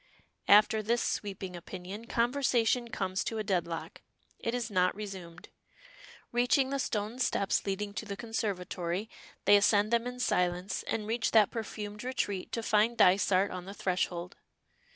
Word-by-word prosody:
After 210 +1 +6
this 235 +3 +1
sweeping 190 -3 -3
opinion, 185 +5 -8
conversation 240 -1 +1
comes 190 -4 -2
to 225 - -2
a 215 - -1
deadlock. 175 -5 -3 0.4
It 230 +1 -2
is 235 -3 -3
not 185 -2 +2
resumed. 190 -5 -8 0.8
Reaching 245 +3 +2
the 275 - -1
stone 220 -1 -2
steps 200 -5 +1
leading 200 +1 -2
to 220 - -5
the 200 -1 -5
conservatory, 200 -4 -3 0.3
they 205 - +7
ascend 205 +1 +4
them 235 +1 +2
in 250 0 -6
silence, 180 -4 0
and 215 - -2
reach 225 +2 -1
that 215 -3 +6
perfumed 210 -2 -5
retreat 205 -7 -2
to 230 - -2
find 225 +2 +2
Dysart 190 +1 +4
on 180 -1 -6
the 195 +1 -8
threshold. 180 -1 -2
205 Hz, 150 wpm, -30 LUFS, 185-230 Hz, 0.8 s, they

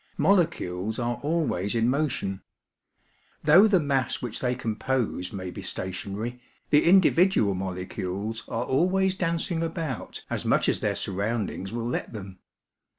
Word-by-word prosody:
Molecules 110 - +1
are 120 0 -1
always 145 - 0
in 115 0 +2
motion. 125 -8 -1 1.0
Though 200 +5 +7
the 195 -4 +4
mass 135 -4 0
which 120 -3 -4
they 125 -1 0
com 115 -3 -3
pose 120 -8 -1
may 95 -2 -5
be - - -7
stationary, 100 +6 -4 0.3
the 150 - +5
individual 175 - +5
molecules 95 +3 -4
are 115 +2 -2
always 185 +7 +2
dancing 170 -1 -1
about 160 -6 -4
as - - -1
much - - +2
as - - +2
their - - 0
surroundings 100 -1 -2
will 115 0 -3
let 120 - -3
them. 95 -3 -8
120 Hz, 140 wpm, -26 LUFS, 100-165 Hz, 1.0 s, Though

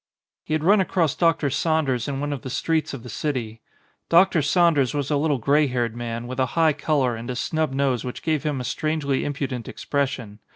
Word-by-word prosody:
He 155 - -1
had 155 - -2
run 195 +4 +5
across 170 -5 +1
Dr. 160 -3 +2
Saunders 145 -5 0
in 140 -1 -3
one 145 +1 -2
of 140 - -5
the 130 - -6
streets 160 +4 0
of 120 - -10
the - - -9
city. 115 -6 -3 0.5
Dr. 170 -1 +5
Saunders 145 -2 +3
was 145 0 -2
a - - +3
little 145 0 +1
grey 145 +5 +3
haired 120 -3 -1
man, 115 0 -4
with 130 +1 -6
a 130 - +2
high 160 -2 +4
colour 145 -4 0
and 115 +2 -7
a 125 - -2
snub 155 +3 -1
nose 135 -3 0
which 125 - -6
gave 155 -3 0
him 150 -3 -2
a - - -4
strangely 145 +1 -1
impudent 135 -4 -3
expres 140 -2 -1
sion. 110 -7 -8
140 Hz, 215 wpm, -23 LUFS, 125-155 Hz, 0.5 s, run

